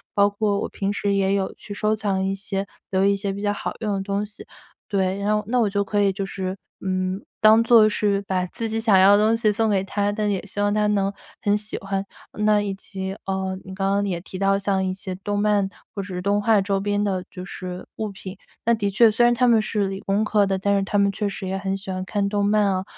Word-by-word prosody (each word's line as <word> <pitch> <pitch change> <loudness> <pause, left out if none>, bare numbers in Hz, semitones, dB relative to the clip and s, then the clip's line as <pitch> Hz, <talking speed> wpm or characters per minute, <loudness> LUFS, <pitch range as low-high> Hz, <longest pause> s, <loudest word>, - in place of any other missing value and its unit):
包 200 0 +5
括 205 0 0
我 - - -3
平 195 0 -2
时 200 -1 0
也 195 0 +2
有 190 -1 -1
去 205 - -8
收 215 +1 +1
藏 200 -3 -1
一 195 - 0
些 195 0 -3 0.3
比 190 - -1
如 190 - +3
一 200 0 +4
些 200 0 -3 0.2
好 205 - -4
用 210 -2 -1
的 195 - -1
东 200 +1 -2
西， 205 0 -11 0.4
对， 190 -2 0
然 210 +1 +1
后 210 - -2
那 250 +1 +1
我 220 - +3
就 200 0 0
可 205 0 0
以 200 -1 +3
就 195 +1 -3
是， 190 0 -4 0.3
嗯， 185 +1 -1 0.2
当 220 +1 +7
做 230 -2 +7
是 205 -1 +1
把 185 -2 -1
自 230 +5 -5
己 220 +1 -1
想 220 -4 +4
要 195 +2 +7
的 210 - +3
东 225 +1 +3
西 215 -2 +2
送 225 +1 +1
给 195 -2 +2
她， 205 +1 -1
但 210 0 -1
也 195 - -2
希 205 - -6
望 205 0 +2
她 210 0 +2
能 200 -1 +1 0.3
很 205 0 +3
喜 210 +1 -5
欢。 195 0 -2 0.3
呃， - - -7
那 210 -1 +4
以 200 -1 -2
及， 190 0 -5
嗯， 190 0 -2
你 190 0 -8
刚 195 0 0
刚 200 +1 +2
也 175 -3 -2
提 185 0 -8
到 195 0 +3
像 195 -1 0
一 185 - -1
些 190 0 -6
动 205 0 -1
漫 205 -2 +2 0.2
或 200 - -3
者 185 -2 -5
动 205 +1 +2
画 215 -1 +4
周 195 0 0
边 205 +1 0
的 190 -3 -1
就 180 0 -8
是 180 -1 -7
物 215 -1 -2
品， 190 0 -8 0.3
那 235 - +4
的 205 -3 0
确 220 +3 +5
虽 240 +3 +2
然 240 - +5
他 250 +1 +2
们 225 -2 +5
是 210 -2 -1
理 195 0 -4
工 200 +2 0
科 210 -1 +3
的， 195 -1 0
但 200 +1 +1
是 - - +1
他 205 +1 -1
们 200 0 +3
确 205 +1 -2
实 195 -1 -6
也 190 - -2
很 195 0 -2
喜 195 0 -7
欢 185 0 -3
看 200 0 -1
动 205 0 0
漫 210 0 +3
啊， 190 -1 0
200 Hz, 280 characters per minute, -23 LUFS, 195-210 Hz, 0.4 s, 当